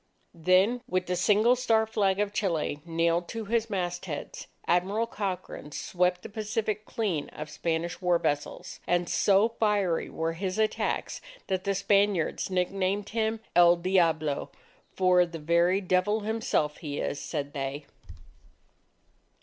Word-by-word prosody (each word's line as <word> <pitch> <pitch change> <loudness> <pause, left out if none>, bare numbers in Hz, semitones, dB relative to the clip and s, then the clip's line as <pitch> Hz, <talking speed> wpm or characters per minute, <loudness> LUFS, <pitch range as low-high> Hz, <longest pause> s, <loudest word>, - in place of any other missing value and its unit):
Then, 185 +8 +3
with 185 -3 0
the 180 - -1
single 210 +6 +4
star 225 -3 +2
Flag 200 -3 +1
of 205 0 0
Chile 165 -8 -1
nailed 170 +1 +1
to 225 -1 -5
his 230 +1 0
mastheads, 175 -5 -4 0.2
Admiral 195 +6 +1
Cochrane 195 -8 -5
swept 180 +3 0
the - - -6
Pacific 215 0 -2
clean 190 -10 -2
of 150 0 -8
Spanish 170 +2 -2
war 180 -1 +3
vessels. 145 -3 -3
And 175 0 +1
so 200 +4 +4
fiery 205 -6 +1
were 165 0 -2
his 185 +3 -3
attacks, 220 0 -1 0.2
that 190 0 -2
the 200 0 +1
Spaniards 200 -3 +1
nicknamed 190 +2 -1
him, 220 0 -1
"El 175 0 +7
Diablo." 165 -5 +1 0.4
"For 185 -1 +4
the 170 -1 -6
very 170 +4 +2
Devil 185 +3 +1
himself, 210 -9 -1
he 145 -4 -5
is," 145 - -2
said 145 0 -4
they. 140 +1 -4
185 Hz, 135 wpm, -28 LUFS, 170-210 Hz, 0.4 s, El